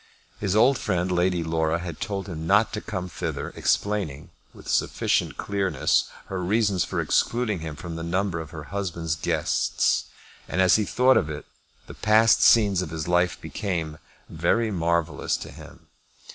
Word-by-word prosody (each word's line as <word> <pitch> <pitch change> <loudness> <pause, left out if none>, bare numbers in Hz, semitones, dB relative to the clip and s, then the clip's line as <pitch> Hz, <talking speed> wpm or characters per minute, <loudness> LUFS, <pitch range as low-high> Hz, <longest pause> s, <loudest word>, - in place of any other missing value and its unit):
His 100 -1 -1
old 120 +5 +4
friend, 90 +1 -1
Lady 90 -1 +1
Laura, 80 0 0
had 85 -2 -7
told 100 -3 -3
him 80 -3 -6
not 105 +4 +3
to - - -3
come 95 -3 -4
thither, - - -5
explaining, 95 -9 -1 0.2
with - - -15
sufficient - - 0
clearness, 100 -2 +1 0.2
her 95 -1 -4
reasons 100 -1 +2
for - - -3
excluding 115 -5 +1
him 80 -2 -6
from 85 +2 -7
the - - -5
number 90 +1 -1
of 80 -2 -7
her 80 -2 -8
husband's 85 -5 -2
guests. 80 - 0 0.4
As 95 0 +4
he 105 - 0
thought 130 +5 +4
of 75 - 0
it 75 -1 -6 0.4
the - - -10
past 110 -1 +4
scenes 100 -5 +5
of 90 - -4
his 80 -1 -5
life 90 0 +1
became 85 -7 -4 0.3
very 110 +8 0
marvellous 85 -4 0
to - - -9
him. - - -14
90 Hz, 160 wpm, -25 LUFS, 80-100 Hz, 0.4 s, scenes